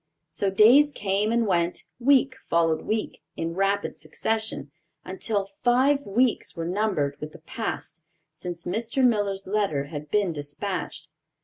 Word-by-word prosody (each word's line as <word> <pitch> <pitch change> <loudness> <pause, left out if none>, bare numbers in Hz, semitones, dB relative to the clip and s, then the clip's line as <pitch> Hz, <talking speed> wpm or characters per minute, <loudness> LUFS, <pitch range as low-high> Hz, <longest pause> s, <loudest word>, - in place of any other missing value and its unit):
So 200 - 0
days 245 +10 +6
came 205 -2 0
and 235 0 +2
went, 175 -3 0 0.2
week 270 +1 +4 0.2
followed 165 -1 +2
week, 215 0 -3 0.2
in 165 0 -2
rapid 195 +2 0
succession, 220 -11 -3 0.3
until 195 +1 -1
five 260 +4 +3
weeks 235 +4 +1
were 165 -1 -3
numbered 175 -7 0
with 150 0 -6
the - - -10
past - - -5 0.3
since 175 -1 -6
Mr. 230 +7 0
Miller's 205 -4 +1
letter 195 -8 0
had 150 0 -6
been 200 -3 +1
dispatched. 155 +1 -5
200 Hz, 135 wpm, -25 LUFS, 170-225 Hz, 0.3 s, days